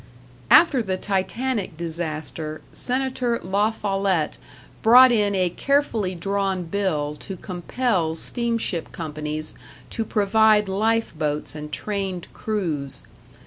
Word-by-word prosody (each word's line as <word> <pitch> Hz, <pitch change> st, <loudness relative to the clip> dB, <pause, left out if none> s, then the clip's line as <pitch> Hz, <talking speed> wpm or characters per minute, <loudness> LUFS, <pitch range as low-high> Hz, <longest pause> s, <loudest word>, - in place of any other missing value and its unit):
After 315 Hz, -7 st, +7 dB
the 190 Hz, -4 st, -2 dB
Titanic 200 Hz, +1 st, -2 dB
disaster, 160 Hz, -2 st, -4 dB
Senator 255 Hz, -2 st, -1 dB
La 200 Hz, +4 st, +2 dB
Follette 195 Hz, -6 st, -1 dB, 0.4 s
brought 250 Hz, +3 st, +8 dB
in 205 Hz, -3 st, +2 dB
a 180 Hz, -2 st, +1 dB
carefully 230 Hz, -8 st, 0 dB
drawn 195 Hz, +1 st, -1 dB
bill 165 Hz, -5 st, -1 dB
to 195 Hz, -, -7 dB
compel 180 Hz, -1 st, -1 dB
steamship 230 Hz, -3 st, -2 dB
companies 155 Hz, -1 st, -3 dB, 0.4 s
to 225 Hz, -, -1 dB
provide 215 Hz, 0 st, +3 dB
life 225 Hz, +4 st, +1 dB
boats 150 Hz, -1 st, -2 dB
and 150 Hz, 0 st, -7 dB
trained 195 Hz, -2 st, -3 dB
crews. 155 Hz, -11 st, -2 dB
195 Hz, 105 wpm, -23 LUFS, 165-220 Hz, 0.4 s, brought